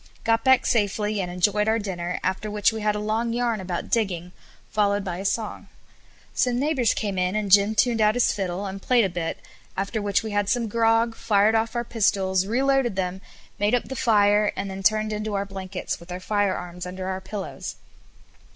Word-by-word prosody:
Got 225 0 +2
back 260 0 +5
safely, 210 -1 +1
and 180 - -3
enjoyed 205 +4 +1
our 220 +1 +3
dinner, 180 -4 -3
after 210 +3 -1
which 210 +1 +2
we 220 - -4
had 210 0 +1
a - - -2
long 220 +2 -1
yarn 235 -3 0
about 180 -2 -4
digging, 180 -6 0 0.4
followed 205 -1 +1
by 180 -3 -4
a 195 - -6
song. 215 +1 -2 0.7
Some 245 -1 +1
neighbours 270 -5 +1
came 200 -4 -2
in, 180 +2 0
and 210 -2 -1
Jim 205 +2 +5
turned 225 +2 +2
out 215 +1 +4
his 245 - +3
fiddle, 190 -1 -3
and 195 0 -6
played 240 -1 +3
a - - 0
bit, 170 -2 -3 0.4
after 200 +3 -2
which 205 +2 +1
we 220 - -4
had 205 -1 0
some 240 -2 +1
grog, 225 +1 +2
fired 210 0 +3
off 225 +2 0
our 235 - 0
pistols, 195 -4 +1
reloaded 265 -1 +1
them, 190 0 -2 0.4
made 205 +4 +3
up 245 - -2
the 265 - -4
fire, 210 -3 +3
and 195 - -4
then 190 0 -6
turned 215 +2 +2
into 210 0 -3
our 200 0 -1
blankets, 190 -1 -5
with 170 +1 -12
our 180 - -4
firearms 185 -3 -2
under 185 +1 -6
our 190 0 -3
pillows. 195 +1 -6
205 Hz, 200 wpm, -24 LUFS, 190-225 Hz, 0.7 s, back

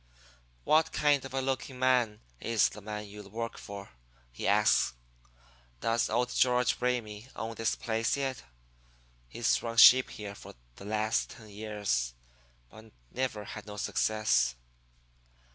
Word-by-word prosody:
"'What 160 +1 +3
kind 145 -2 +2
of 135 - -8
a 135 - +1
looking 130 0 -3
man 125 -4 +2 0.2
is 115 -2 +2
the 105 - -11
man 105 0 -5
you 105 +1 -10
work 115 +2 -4
for?' 100 -1 -9 0.4
he - - -4
asks. 105 - +3 0.8
'Does 115 - +1
old 125 +2 0
George 125 -1 +2
Ramey 120 -3 -2
own 115 +1 -4
this 115 0 -1
place 115 +3 -1
yet? 135 -2 -2 0.9
He's 115 - +1
run 115 -1 -5
sheep 130 +2 +9
here 105 -2 -7
for - - -12 0.2
the 100 - -10
last 110 +1 0
ten 110 -2 -13
years, 100 - -2 0.6
but 110 0 -14 0.2
never 125 -5 -2
had 105 +1 -9
no 105 0 -8
success.' 105 - +1
110 Hz, 140 wpm, -30 LUFS, 105-125 Hz, 0.9 s, sheep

